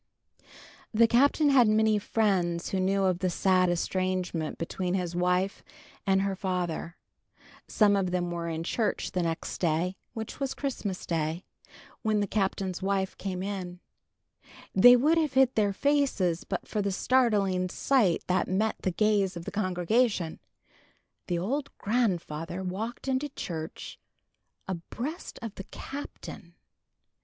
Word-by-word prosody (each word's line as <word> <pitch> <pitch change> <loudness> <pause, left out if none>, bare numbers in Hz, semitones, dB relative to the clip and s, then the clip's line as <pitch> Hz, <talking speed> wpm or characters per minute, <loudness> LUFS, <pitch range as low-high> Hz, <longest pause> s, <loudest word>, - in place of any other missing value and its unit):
VIII. - - -30 0.5
The 230 +1 +6
Captain 285 +5 +4
had 250 -4 +6
many 215 0 +3
friends 190 -6 0
who 190 - -1
knew 195 +1 +2
of 185 -2 +2
the 185 - +1
sad 185 0 +3
estrangement 180 -2 -1
between 180 +2 -2
his 175 -2 -2
wife 180 +2 0 0.4
and 195 0 +3
her 195 -1 -1
father. 180 -3 -3 0.7
Some 205 -2 +4
of 195 -2 +1
them 175 -1 -1
were 170 -1 -3
in 160 0 -3
church 215 +4 -1
the 180 - 0
next 165 -1 -3
day, 170 +2 +1 0.2
which 220 -1 -6
was 275 -1 -2
Christmas 220 -9 -3
Day, 165 +1 -1 0.6
when 215 -1 +1
the 205 - +1
Captain's 195 -2 -1
wife 190 0 0
came 185 -2 -3
in. 185 -3 -5 0.9
They 245 +6 +9
would 305 +7 +3
have 305 -4 0
hid 265 -1 +4
their 205 -2 +2
faces, 215 - +1
but - - -4
for 210 - -1
the 200 0 0
startling 200 -5 +2
sight 220 - +2
that 185 +1 +1
met 215 +4 0
the - - 0
gaze 200 -1 +1
of 170 - -7
the - - -5
congregation. 185 -1 0 0.9
The 175 - 0
old 265 +11 -2
grandfather 185 -6 -1
walked 215 +8 -4
into 265 +2 0
church 160 - -6 0.7
abreast 235 - -5
of 225 -3 -5
the 195 - -8
Captain. 285 +2 -8
190 Hz, 145 wpm, -28 LUFS, 180-220 Hz, 0.9 s, They